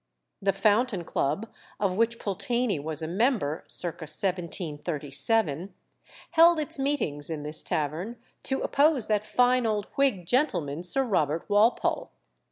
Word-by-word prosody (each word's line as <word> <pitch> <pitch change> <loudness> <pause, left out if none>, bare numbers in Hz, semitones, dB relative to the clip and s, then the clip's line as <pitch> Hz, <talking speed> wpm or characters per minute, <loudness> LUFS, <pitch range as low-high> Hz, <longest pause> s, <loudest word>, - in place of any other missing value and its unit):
The 195 0 +2
Fountain 210 0 +1
Club, 160 +7 -2 0.3
of 195 -3 0
which 230 +2 +1
Pulteney 205 0 -1
was 155 +2 -1
a - - -3
member 190 - -1
(circa 170 -2 +3
1737), 160 0 -2 0.6
held 335 0 +5
its 295 -2 -1
meetings 220 - -1
in 155 -3 -5
this 150 +1 +4
tavern, 160 +10 -3 0.3
to 265 - -2
oppose 285 -4 +2
that 210 -1 0
fine 250 +2 +2
old 210 -2 -1
Whig 265 -11 +1
gentleman 170 - 0
Sir 225 +10 +2
Robert 165 - -1
Walpole. 210 +3 +1
200 Hz, 130 wpm, -26 LUFS, 160-240 Hz, 0.6 s, held